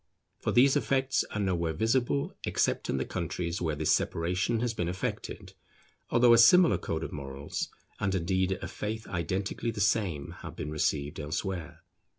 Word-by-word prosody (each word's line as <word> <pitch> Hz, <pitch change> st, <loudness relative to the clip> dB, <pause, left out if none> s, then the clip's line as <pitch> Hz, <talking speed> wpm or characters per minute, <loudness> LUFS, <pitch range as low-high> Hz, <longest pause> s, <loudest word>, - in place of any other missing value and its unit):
For -, -, -1 dB
these 135 Hz, +3 st, +5 dB
effects 135 Hz, 0 st, +1 dB
are 105 Hz, -, -4 dB
nowhere 85 Hz, -5 st, 0 dB
visible 120 Hz, -, 0 dB
except -, -, 0 dB
in -, -, +1 dB
the 65 Hz, -, -1 dB
countries 85 Hz, -1 st, -3 dB
where 80 Hz, -3 st, 0 dB
this 75 Hz, +1 st, +2 dB
separation 90 Hz, +7 st, 0 dB
has 120 Hz, -2 st, 0 dB
been 90 Hz, -6 st, -2 dB
effected, 90 Hz, +1 st, -4 dB, 0.6 s
although 120 Hz, 0 st, +6 dB
a 115 Hz, -, +6 dB
similar 175 Hz, +9 st, +7 dB
code 80 Hz, 0 st, -3 dB
of -, -, -5 dB
morals 70 Hz, -1 st, -5 dB, 0.3 s
and 95 Hz, -1 st, 0 dB
indeed 95 Hz, +1 st, +1 dB
a -, -, -3 dB
faith 110 Hz, +1 st, -4 dB
identically 95 Hz, +5 st, -2 dB
the 110 Hz, -2 st, -4 dB
same 100 Hz, -8 st, +1 dB
have -, -, -8 dB
been 75 Hz, -, -5 dB
received 75 Hz, +1 st, -1 dB
elsewhere. 85 Hz, +2 st, -4 dB
95 Hz, 160 wpm, -29 LUFS, 80-115 Hz, 0.6 s, similar